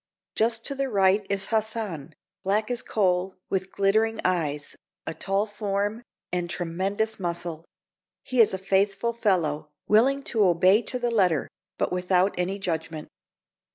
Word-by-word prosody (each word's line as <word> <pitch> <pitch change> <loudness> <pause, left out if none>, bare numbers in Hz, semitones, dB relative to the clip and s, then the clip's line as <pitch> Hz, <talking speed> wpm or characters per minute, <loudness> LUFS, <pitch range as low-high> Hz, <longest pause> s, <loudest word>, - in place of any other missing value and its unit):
Just 225 +2 +1
to 280 - 0
the 275 0 -2
right 195 -1 +3
is 195 -1 0
Hassan, 215 -9 -2 0.3
black 210 +4 0
as 245 0 0
coal, 185 -4 0 0.2
with 190 0 -1
glittering 220 +3 +2
eyes, 150 -5 -1 0.3
a - - -3
tall 195 +4 0
form, 205 +1 -2 0.3
and 175 -1 -2
tremendous 190 +6 -2
muscle; 170 -2 -4 0.6
he 255 -2 +3
is 220 - +5
a 190 - -1
faithful 195 +4 +1
fellow, 165 -10 0 0.2
willing 265 +6 +4
to 220 -5 +2
obey 185 +3 +5
to 250 - -2
the 240 -1 -1
letter, 185 -9 +2 0.3
but - - 0
without 180 +1 +2
any 180 +2 -1
judgment. 160 -5 -4
195 Hz, 145 wpm, -26 LUFS, 180-220 Hz, 0.6 s, is